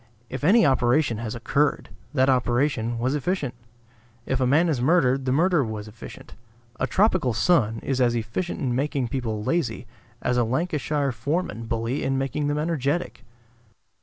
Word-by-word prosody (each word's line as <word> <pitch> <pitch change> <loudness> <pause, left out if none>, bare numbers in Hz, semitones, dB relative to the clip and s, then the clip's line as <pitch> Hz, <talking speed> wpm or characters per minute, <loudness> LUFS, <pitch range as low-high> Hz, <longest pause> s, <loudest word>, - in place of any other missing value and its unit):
If 130 +2 -5
any 215 +8 +5
operation 125 -2 +2
has 115 -1 -4
occurred, 145 +5 0 0.2
that 130 -2 +2
operation 125 -2 +1
was 125 +3 0
efficient. 150 -2 -1 0.7
If 130 0 -1
a 130 - +3
man 155 +7 +4
is 145 -7 0
murdered, 135 -3 +3
the 130 - 0
murder 165 +2 +3
was 110 -2 -5
efficient. 105 +1 -11 0.5
A 130 - 0
tropical 185 - +2
sun 115 -4 +2
is 130 -1 -1
as 120 -1 +3
efficient 115 +11 -3
in 130 -3 -1
making 135 -1 -1
people 110 -4 -3
lazy 125 -6 -1 0.4
as 125 - +1
a - - +3
Lancashire 145 +2 -1
foreman 115 - -3
bully 115 +4 -2
in 135 0 0
making 135 +2 -1
them 145 0 0
energetic. 155 -2 -2
130 Hz, 160 wpm, -24 LUFS, 120-150 Hz, 0.7 s, any